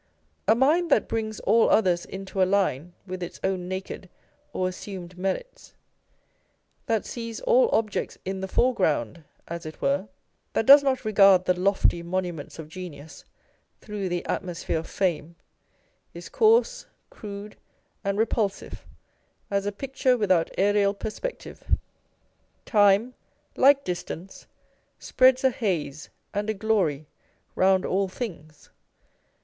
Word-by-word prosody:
A 220 - +6
mind 310 +8 +3
that - - +3
brings 220 -1 -3
all 230 0 +4
others 180 -5 +2
into 195 0 -5
a - - +7
line 180 -4 0
with 185 -1 -6
its 175 - -6
own 185 -2 -1
naked 185 0 -6 0.4
or 185 - -1
assumed 185 -1 -7
merits, 195 - -5 1.1
that 225 -2 0
sees 230 -2 -6
all - - +4
objects 215 -2 -1
in 190 0 -3
the 190 - -3
foreground 170 - 0 0.2
as 170 0 -6
it 155 -1 -9
were, 190 +2 0 0.5
that 225 - 0
does 280 +3 +10
not 260 -3 -1
regard 195 -3 +5
the 180 - +3
lofty 180 -1 +1
monuments 175 -3 -4
of 160 -2 -8
genius 160 -3 -10 0.5
through 205 -3 -5
the 175 0 -3
atmosphere 175 -3 -3
of 160 - -9
fame, 170 -3 -1 0.8
is - - -9
coarse, 470 +3 +3 0.2
crude, 205 -1 -9 0.5
and 200 0 -1
repulsive 215 -2 -2 0.6
as 200 0 0
a - - 0
picture 260 +3 0
without 185 -6 +2
aerial 200 0 +2
perspective. 355 - -4 0.9
Time, 205 +3 +4 0.4
like 280 +1 +5
distance, 180 0 -6 0.5
spreads 260 0 +3
a 265 - +4
haze 165 - -3 0.2
and 205 +1 -2
a 220 - -1
glory 190 -9 0 0.5
round 190 0 +3
all 195 +1 0
things. 170 - -8
195 Hz, 130 wpm, -25 LUFS, 180-225 Hz, 1.1 s, does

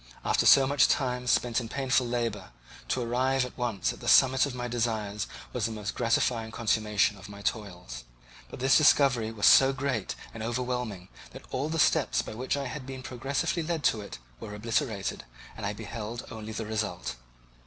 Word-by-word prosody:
After - - +2
so 135 - +8
much 140 +1 +4
time 125 -2 0
spent 120 -1 +2
in 115 - -7
painful 130 -1 +1
labour, 115 -5 -2 0.4
to 125 - -1
arrive 130 +2 +1
at 125 - -10
once 120 -5 -1
at - - -13
the - - -8
summit 130 +1 +5
of 130 - -6
my 125 0 -3
desires 110 -4 -2 0.3
was 120 -4 -1
the - - -6
most 105 -2 -4
gratifying 115 -1 0
consummation 105 -2 +1
of 100 - -11
my 100 0 -10
toils. 90 - -4 0.5
But - - -9
this 135 +1 +4
discovery 135 -7 +4
was 105 -2 -1
so 135 0 +7
great 135 -7 -2 0.2
and 115 - -8
overwhelming 120 -5 -3 0.2
that - - -11
all 140 +4 -2
the 165 - -2
steps - - +2
by - - -7
which 130 +5 -2
I 140 - -3
had 135 -1 -6
been 130 -1 -7
progressively 140 +7 -2
led 160 -1 -2
to 110 - -6
it 100 - -8 0.2
were 105 - -7
obliterated, 105 -2 -2 0.3
and 105 -2 -4
I 105 - -2
beheld 110 +2 -6
only 110 -2 -7
the 110 0 -4
result. 105 - -3
120 Hz, 185 wpm, -28 LUFS, 105-130 Hz, 0.5 s, so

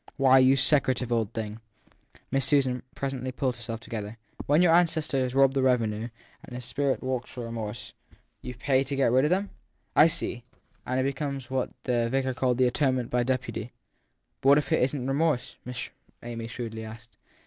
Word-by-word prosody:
Why, 135 -1 +6
you 130 +1 +5
secretive 130 -3 +2
old 115 -3 0
thing! 110 0 -5 0.7
Miss 135 0 +2
Susan 130 -4 +2
presently 130 -2 -3
pulled 130 -1 -1
herself 115 -1 -6
more - - -16
together. 110 0 -6 0.3
When 150 +5 +4
your 165 -2 +5
ancestor 160 -5 +2
has 130 0 -1
robbed 135 -1 +5
the 135 - +1
revenue 115 -4 +1 0.4
and 125 - -10
his 125 -1 -6
spirit 140 0 -1
walks 130 -1 -3
for 125 - -7
remorse 115 -2 -6 0.2
1 - - -26 0.2
You 125 0 -7
pay 130 +2 +1
to 140 +1 -4
get 135 -4 +2
rid 130 +3 +4
of 150 - +1
him? 195 +2 0 0.4
I 155 - +8
see 120 -6 -2 0.4
and 130 +1 0
it - - +2
becomes 135 -2 -3
what 130 -1 0
the 120 -2 0
vicar 130 +1 0
called 125 -1 0
his 130 -1 +4
atonement 130 -2 0
by 125 - +2
deputy. 125 -2 -3 0.7
But 135 - +3
what 140 - +7
if 145 -2 -1
it - - +3
isn 135 +2 0
t 125 - -4
remorse? 145 -1 0
Miss 125 0 -5 0.3
Amy 115 -1 -5
shrewdly 115 -2 -6
asked. 110 0 -11
130 Hz, 195 wpm, -27 LUFS, 120-135 Hz, 0.7 s, I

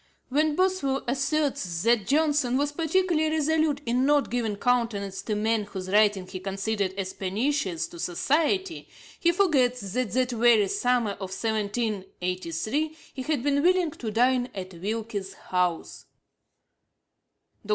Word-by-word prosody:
When 300 +3 +2
Boswell 365 -8 +1
asserts 270 - -1
that 230 -3 +2
Johnson 290 -3 +2
'was 290 +1 0
particularly 325 0 +1
resolute 310 -1 +1
in 245 +2 +1
not 290 +1 +2
giving 230 -4 -1
countenance 210 -4 0
to 215 - -2
men 220 0 0
whose 190 -2 -6
writings 205 -3 +3
he 185 - -5
considered 195 +1 -2
as 190 -1 -3
pernicious 195 - -1
to 170 - -11
society,' 325 - 0 0.3
he 340 - +4
forgets 280 -10 +2
that 250 -3 0
that 255 0 +1
very 230 -3 +4
summer 245 -2 +1
of 195 -1 -6
1783 215 - -2 0.2
he 265 - -5
had 285 -2 -1
been 285 0 +2
willing 360 -1 +3
to 255 -8 -6
dine 245 +3 +2
at 185 -1 -6
Wilkes's 200 +1 -4
house 180 -3 -2 1.6
(ante, - - -13
p. - - -16
240 Hz, 140 wpm, -26 LUFS, 200-290 Hz, 1.6 s, he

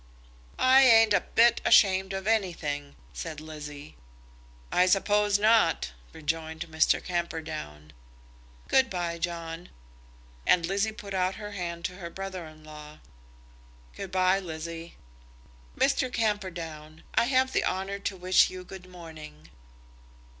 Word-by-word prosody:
"I 260 +1 +6
ain't 225 -4 +6
a - - +4
bit 235 0 +3
ashamed 190 -1 +4
of 195 0 -4
anything," 165 -10 -1 0.2
said 160 -3 -6
Lizzie. 150 -1 -9 0.7
"I 180 +1 +4
suppose 205 +2 +3
not," 210 - +3 0.2
rejoined 160 +1 -4
Mr. 160 0 +2
Camperdown. 155 - -5 0.7
"Good 265 0 +3
bye, 170 -2 -3
John." 170 0 -5 0.8
And 170 -2 +4
Lizzie 200 +5 0
put 210 -2 -9
out 185 0 0
her 210 -1 -7
hand 175 -3 -5
to 180 - -4
her 170 -3 -7
brother 190 -2 -6
in 155 0 -15
law. 150 0 -11 1.0
"Good 195 -2 -7
bye, 185 +1 +3
Lizzie." 165 -1 -7 0.8
"Mr. 265 -2 +2
Camperdown, 170 -9 -3
I - - +3
have 260 +1 +2
the - - +2
honour 195 +2 -2
to 200 -1 -4
wish 185 +1 +4
you 185 0 -8
good 185 0 -11
morning." 155 - -12
180 Hz, 125 wpm, -28 LUFS, 160-200 Hz, 1.0 s, I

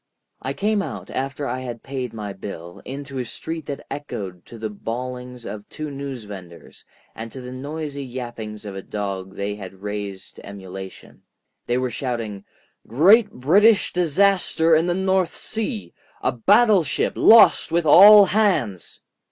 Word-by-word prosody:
I 135 +2 -3
came 210 +5 0
out, - - -7
after 135 +2 -3
I 125 0 -3
had 120 -3 -7
paid 130 -3 -4
my 105 -3 -6
bill, 90 -3 -9
into 135 0 -6
a - - -1
street 160 +6 -6
that 140 - -6
echoed 95 -11 -6
to 115 - -11
the 110 -1 -4
bawlings 125 +3 -6
of 105 0 -8
two 155 -1 -6
newsvendors 105 -11 -9 0.3
and 115 0 -8
to 135 - -8
the 125 0 -8
noisy 140 +2 -5
yappings 120 -4 -7
of 100 -2 -7
a 95 - -5
dog 95 -2 -5
they 100 +1 -3
had 95 -1 -11
raised 100 -2 -6
to - - -12
emulation. 95 -1 -10 0.5
They 120 - +1
were 130 -1 -1
shouting: 115 -6 -4 0.4
"Great 200 - +5
British 195 - +3
disaster 180 -1 +2
in 160 +2 +2
the 175 - +1
North 190 -1 +1
Sea. 105 - -4 0.3
A 125 - +2
battleship 190 - +3
lost 225 -7 +6
with 170 0 +1
all 205 +6 +9
hands!" 170 - 0
125 Hz, 150 wpm, -22 LUFS, 105-160 Hz, 0.5 s, all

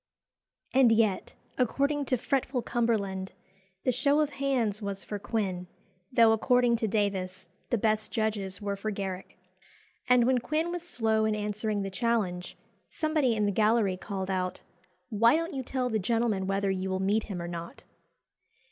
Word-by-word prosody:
And 260 -3 +6
yet, 220 -4 +2 0.3
according 280 +4 +1
to 255 -1 +1
fretful 255 0 -1
Cumberland, 200 -5 -1 0.5
"the 255 - +2
show 280 +4 +2
of 300 -1 +1
hands" 245 -7 0
was 200 -1 -4
for 205 - -5
Quin, 190 -5 -2 0.4
though, 230 -3 +6
according 245 +2 +3
to 220 - -1
Davies, 190 -3 -1 0.2
the 240 - +2
best 215 0 0
judges 205 -4 -2
were 200 -1 -2
for 200 +2 -4
Garrick. 195 -2 -5 0.7
And 250 -1 +6
when 255 0 +3
Quin 315 +7 -1
was 350 0 -3
slow 220 -9 +1
in 215 -1 +1
answering 210 0 -2
the 195 - -4
challenge, 190 -5 -1 0.3
somebody 310 -7 +1
in 210 -1 +1
the 205 - +2
gallery 215 -1 +2
called 190 0 -4
out, 185 -1 -2 0.5
"Why 230 +5 +4
don't 330 +1 -2
you 270 - -2
tell 255 0 -2
the 220 -3 0
gentleman 215 -2 0
whether 195 0 +1
you 190 0 -2
will 190 0 -1
meet 205 +3 +1
him 195 -4 -5
or 170 - -4
not?" 170 -1 -7
220 Hz, 165 wpm, -29 LUFS, 195-245 Hz, 0.7 s, And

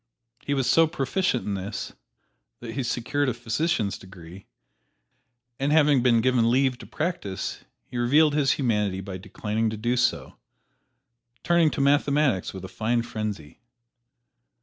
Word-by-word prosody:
He 140 - -2
was 135 -2 0
so 165 0 +5
proficient 155 -1 -1
in 105 - -2
this 100 +1 -5 0.7
that 115 -1 -7
he 135 - -2
secured 130 +3 -1
a 120 - -2
physician's 120 -1 -1
degree; 95 0 -13 1.1
and 140 +2 0
having 150 -4 +4
been 120 -2 +4
given 125 -2 +3
leave 130 0 +2
to - - -11
practise 100 - -4 0.2
he 120 - -6
revealed 145 +5 +4
his 145 -2 +3
humanity 105 -7 0
by 95 -1 -6
declining 105 +3 -2
to 110 - -5
do 120 +3 0
so, 120 - 0 1.1
turning 170 -2 +4
to 140 - -3
mathematics 140 -5 +2
with 95 -1 -8
a - - -6
fine 115 +4 -1
frenzy. 105 -10 -6
120 Hz, 145 wpm, -25 LUFS, 105-140 Hz, 1.1 s, so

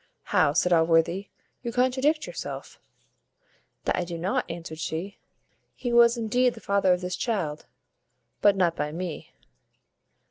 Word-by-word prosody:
"How!" 145 - +4
said 180 +2 +3
Allworthy; 165 +3 +2 0.3
"you 235 - -4
contradict 260 +5 +1
yourself." - - -7 1.0
"That - - +1
I 180 - -1
do 170 -1 -5
not," 175 +2 -1
answered 165 -2 -7
she; 165 +5 -4 0.6
"he 245 -2 -3
was 235 0 +6
indeed 245 +2 +1
the - - -10
father 200 -3 +2
of 180 0 +2
this 180 0 -3
child, 175 -11 -2 0.7
but 205 -1 +5
not 175 -3 +2
by 150 -1 -2
me." 170 0 -6
185 Hz, 140 wpm, -26 LUFS, 165-235 Hz, 1.0 s, was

